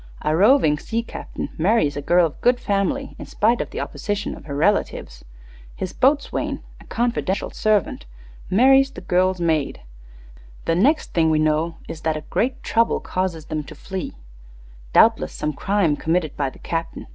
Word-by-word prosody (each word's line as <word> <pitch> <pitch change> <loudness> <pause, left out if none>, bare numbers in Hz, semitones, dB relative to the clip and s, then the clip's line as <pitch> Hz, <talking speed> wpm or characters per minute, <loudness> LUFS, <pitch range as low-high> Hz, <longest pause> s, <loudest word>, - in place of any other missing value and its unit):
A 155 - +1
roving 195 - +4
sea 230 +6 -2
captain - - -7
marries 185 -4 +2
a 145 - -3
girl 175 +4 +4
of 155 - -6
good 245 0 +3
family 200 -4 -1
in - - -8
spite 230 +3 +1
of - - -5
the - - -6
opposition 205 -1 -3
of - - -14
her 140 -2 -5
relatives. 150 - 0 0.5
His 185 -1 -5
boatswain, 280 +2 0 0.2
a - - -16
confidential 235 -5 -1
servant, 210 - 0 0.4
marries 270 +6 +5
the 275 - -10
girl's 185 0 +1
maid. 160 -4 0 0.8
The 165 - +2
next 265 - +2
thing 165 -2 +3
we 155 - +3
know 155 +2 +1
is 160 - -7
that 160 -1 0
a - - -6
'great 245 - -2
trouble' 230 0 +2
causes 180 -4 -3
them 155 -1 -3
to - - -11
flee 190 -1 -6 0.8
doubtless - - +4
some 150 0 -3
crime 185 0 +1
committed 160 0 -1
by 140 -2 -1
the - - -16
captain. 165 0 -4
180 Hz, 170 wpm, -22 LUFS, 155-220 Hz, 0.8 s, marries